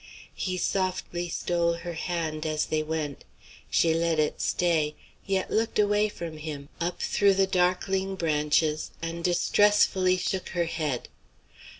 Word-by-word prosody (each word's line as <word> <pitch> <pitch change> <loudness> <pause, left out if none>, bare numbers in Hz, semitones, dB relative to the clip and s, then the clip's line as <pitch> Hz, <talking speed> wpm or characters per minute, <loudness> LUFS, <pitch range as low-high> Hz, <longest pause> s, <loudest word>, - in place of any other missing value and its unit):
He 185 -1 -2
softly 180 -1 -1
stole 170 0 0
her 170 +1 -6
hand 160 -2 -3
as 155 -1 0
they 155 -1 0
went. 155 -2 -3 0.5
She 165 -1 +3
let 165 0 +1
it 155 -1 0
stay, 160 -4 +1 0.3
yet 190 -1 0
looked 225 +1 0
away 210 0 +3
from 165 -5 -7
him, 150 -2 -6
up 175 +1 -2
through 200 -1 +3
the 195 0 +4
darkling 190 +1 +1
branches, 155 -2 +1
and 165 +1 -4
distressfully 185 +1 +3
shook 185 0 -2
her 170 - +2
head. 155 -6 -2
170 Hz, 135 wpm, -27 LUFS, 155-185 Hz, 0.5 s, the